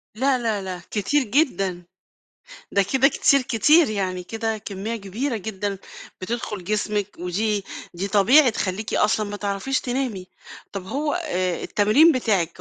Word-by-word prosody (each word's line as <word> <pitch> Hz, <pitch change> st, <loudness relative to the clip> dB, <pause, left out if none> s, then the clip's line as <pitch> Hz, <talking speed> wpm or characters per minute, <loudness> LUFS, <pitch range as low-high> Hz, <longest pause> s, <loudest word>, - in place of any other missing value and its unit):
لا، 260 Hz, +3 st, +2 dB
لا، 225 Hz, -4 st, -1 dB
لا، 185 Hz, -2 st, -6 dB
كتير 245 Hz, +8 st, +1 dB
جدًا. 205 Hz, -, 0 dB, 0.9 s
ده 200 Hz, -, +3 dB
كده 265 Hz, +1 st, +5 dB
كتير 275 Hz, 0 st, +3 dB
كتير 290 Hz, +6 st, +4 dB
يعني، 185 Hz, -3 st, -2 dB
كده 225 Hz, +3 st, -3 dB
كمية 210 Hz, +2 st, -5 dB
كبيرة 225 Hz, +5 st, -3 dB
جدًا 200 Hz, -1 st, -4 dB, 0.4 s
بتدخل 210 Hz, -1 st, -4 dB
جسمك 210 Hz, +1 st, -1 dB
ودي 200 Hz, +4 st, -1 dB, 0.3 s
دي 185 Hz, +3 st, -3 dB
طبيعي 240 Hz, +8 st, +5 dB
تخلّيكِ 210 Hz, 0 st, -3 dB
أصلًا 210 Hz, 0 st, +1 dB
ما 205 Hz, -, -5 dB
تعرفيش 205 Hz, +7 st, -2 dB
تنامي. 245 Hz, -7 st, -3 dB, 0.4 s
طب 195 Hz, -2 st, -6 dB
هو 290 Hz, +5 st, -1 dB
آآ، 185 Hz, -, -2 dB
التمرين 215 Hz, +11 st, +4 dB
بتاعك 210 Hz, -, 0 dB
215 Hz, 140 wpm, -23 LUFS, 195-255 Hz, 0.9 s, كده